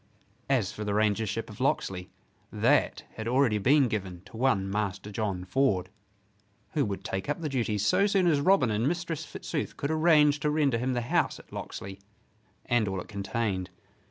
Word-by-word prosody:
As 125 -9 +2
for 105 - -6
the 105 -1 -1
Rangership 110 +1 0
of 105 +2 -10
Locksley, 95 -8 -1 0.4
that - - +2
had 110 - -4
already 120 -3 +3
been 135 +5 +4
given 95 -6 -4
to - - -14
one 110 -6 +1
Master 100 0 -3
John 100 -4 -2
Ford, 95 -3 +1 0.8
who 150 -3 +1
would 100 -2 -4
take 95 +7 -4
up 145 - -1
the 160 - -3
duties 110 -6 -1
so 195 - +4
soon 195 -2 +2
as 155 -5 +3
Robin 145 - +4
and 110 +4 +1
Mistress 170 -1 -2
Fitzooth 150 - -4
could 140 - -2
arrange 155 -2 +4
to 150 - 0
render 145 -5 +2
him 130 +2 0
the 120 - 0
house 120 - +1
at - - -16
Locksley 95 0 -7 0.7
and 120 -3 +2
all 95 -1 -2
it - - -8
contained. 100 -2 -2
115 Hz, 180 wpm, -28 LUFS, 100-145 Hz, 0.8 s, been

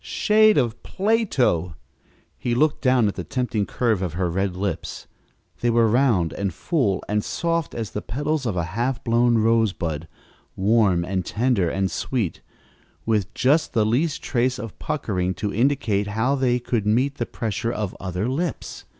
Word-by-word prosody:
Shade 215 0 +4
of 120 -4 0
Plato! 165 - +1 0.6
He 120 -1 -2
looked 150 +4 +2
down 125 -4 +3
at 100 - -1
the 90 - -5
tempting 110 +1 -2
curve 115 -6 0
of 90 -4 -2
her 90 0 -1
red 95 +1 -1
lips. 95 -2 -4 0.5
They 120 - +1
were 115 -1 +4
round 110 -8 +2
and 100 -1 -2
full 120 - 0
and 105 0 0
soft 170 -2 -2
as 115 -4 -4
the 105 - -4
petals 145 +4 -2
of 100 -5 -2
a 85 - +1
half 120 +3 -1
blown 120 0 +3
rosebud, 105 -9 +1 0.5
warm 95 -4 +3
and 95 0 -1
tender 110 -4 +1
and 95 +1 -1
sweet, 115 -10 -2 0.6
with 105 -3 0
just 145 +4 +2
the 110 -3 +3
least 140 +9 0
trace 125 0 0
of 115 -5 -8
puckering 95 -12 -2
to 105 -1 -3
indicate 115 -4 +1
how 110 +6 0
they 130 -3 +2
could 120 -3 -2
meet 130 +6 +1
the - - -1
pressure 115 -1 -3
of 105 -5 -3
other 90 +3 -3
lips. 150 +5 -3
115 Hz, 165 wpm, -23 LUFS, 100-130 Hz, 0.6 s, Shade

